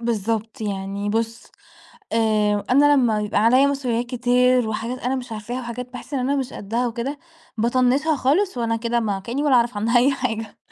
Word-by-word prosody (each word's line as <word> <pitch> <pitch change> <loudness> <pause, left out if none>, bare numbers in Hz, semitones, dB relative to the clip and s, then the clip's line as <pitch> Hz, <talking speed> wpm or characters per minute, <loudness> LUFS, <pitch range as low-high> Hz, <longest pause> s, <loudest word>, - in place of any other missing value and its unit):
بالضبط، 225 -1 -2
يعني 200 0 -3
بُصّ 225 +2 -2 0.7
آآ، 215 -2 +2
أنا 290 +3 +5
لمّا 230 -6 +2
يبقى 210 -1 0
عليَّ 255 +5 +5
مسؤوليات 250 -4 -1
كتير 250 0 +2
وحاجات 225 +4 -3
أنا 255 +2 -1
مش 255 -2 -6
عارفاها 225 +3 -5
وحاجات 250 0 -6
باحس 250 +3 -9
إن 275 - 0
أنا 265 +3 0
مش 265 -3 -3
قدّها 230 +5 -2
وكده، 245 +5 -4 0.4
باطنّشها 255 +7 +2
خالص 305 +7 +1
وأنا 230 -1 0
كده 235 +1 -1
ما 205 -4 -1
كأني 240 +8 -3
ولا 285 -3 +4
أعرف 235 -2 +2
عنها 230 +4 +2
أي 260 +4 +4
حاجة، 225 -4 -4
240 Hz, 180 wpm, -22 LUFS, 220-255 Hz, 0.7 s, أنا